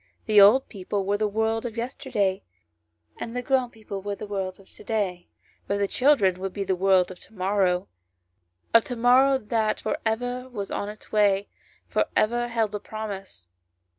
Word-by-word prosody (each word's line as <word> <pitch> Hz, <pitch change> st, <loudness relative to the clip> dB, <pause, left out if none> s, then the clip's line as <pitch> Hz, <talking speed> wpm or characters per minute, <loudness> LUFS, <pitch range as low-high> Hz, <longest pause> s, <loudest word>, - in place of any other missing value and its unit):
The 210 Hz, -2 st, +6 dB
old 220 Hz, +7 st, +6 dB
people 195 Hz, -1 st, -3 dB
were 200 Hz, +1 st, +1 dB
the 215 Hz, -, +2 dB
world 220 Hz, +2 st, 0 dB
of 235 Hz, -2 st, -6 dB
yesterday; 210 Hz, -5 st, -1 dB, 0.8 s
and 230 Hz, -, -6 dB
the 250 Hz, -, -2 dB
grown 260 Hz, -1 st, +1 dB
people 215 Hz, -4 st, -8 dB
were 200 Hz, +1 st, -3 dB
the 215 Hz, -, -7 dB
world 195 Hz, -2 st, -4 dB
of 195 Hz, -, -18 dB
to -, -, -15 dB
day; 190 Hz, -6 st, -2 dB, 0.4 s
but 200 Hz, -, 0 dB
the 200 Hz, 0 st, +1 dB
child 275 Hz, +5 st, +3 dB
ren 185 Hz, -2 st, +2 dB
would 190 Hz, 0 st, -4 dB
be 200 Hz, -, -2 dB
the 190 Hz, -1 st, 0 dB
world 185 Hz, 0 st, +3 dB
of 180 Hz, -, -11 dB
to -, -, -15 dB
morrow: 185 Hz, -1 st, +1 dB, 0.9 s
of 230 Hz, -1 st, +7 dB
to 245 Hz, -, -4 dB
morrow 255 Hz, +3 st, +5 dB
that 220 Hz, -2 st, -1 dB
for -, -, -2 dB
ever 245 Hz, +3 st, -2 dB
was 205 Hz, -5 st, -5 dB
on 205 Hz, -, -3 dB
its 210 Hz, 0 st, -12 dB
way, 205 Hz, -2 st, +2 dB, 0.4 s
for -, -, +1 dB
ever 240 Hz, +2 st, +2 dB
held 225 Hz, -3 st, -1 dB
a 210 Hz, -, -2 dB
promise. 200 Hz, -, -7 dB
210 Hz, 190 wpm, -25 LUFS, 195-230 Hz, 0.9 s, of